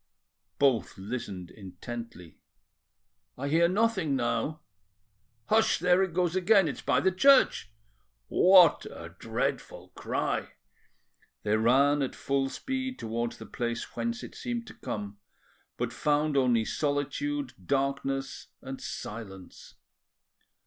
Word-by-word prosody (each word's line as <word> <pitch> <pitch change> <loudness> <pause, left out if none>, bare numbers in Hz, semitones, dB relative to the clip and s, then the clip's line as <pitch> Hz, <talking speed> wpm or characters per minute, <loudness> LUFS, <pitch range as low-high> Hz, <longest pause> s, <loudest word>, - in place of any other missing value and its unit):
Both 135 -6 +2
listened 95 -3 -6
intently. 95 -1 -9 1.0
"I 140 - -3
hear 165 +3 +4
nothing 190 -6 +1
now." 125 +4 -1 0.8
"Hush! 220 +1 +3
there 180 +2 +3
it 190 -2 0
goes 180 -1 +1
again. 190 0 +4
It's 145 - -4
by - - +2
the 190 - +3
church." 265 - +4 0.6
"What 180 -3 +6
a - - -9
dreadful - - -3
cry!" - - -3 0.9
They 105 0 +2
ran 135 +6 +4
at 135 - -2
full 135 -1 -1
speed 260 - -4
towards 115 +1 -3
the - - -9
place 120 -1 -4
whence 235 +1 -3
it - - -9
seemed 240 -1 -4
to - - -11
come, 105 -1 -6 0.6
but - - -2
found 150 0 +1
only 125 -4 +3
solitude, 255 - -2
darkness, 135 0 -1
and 135 0 -8
silence. 95 -4 -8
140 Hz, 115 wpm, -29 LUFS, 115-185 Hz, 1.0 s, What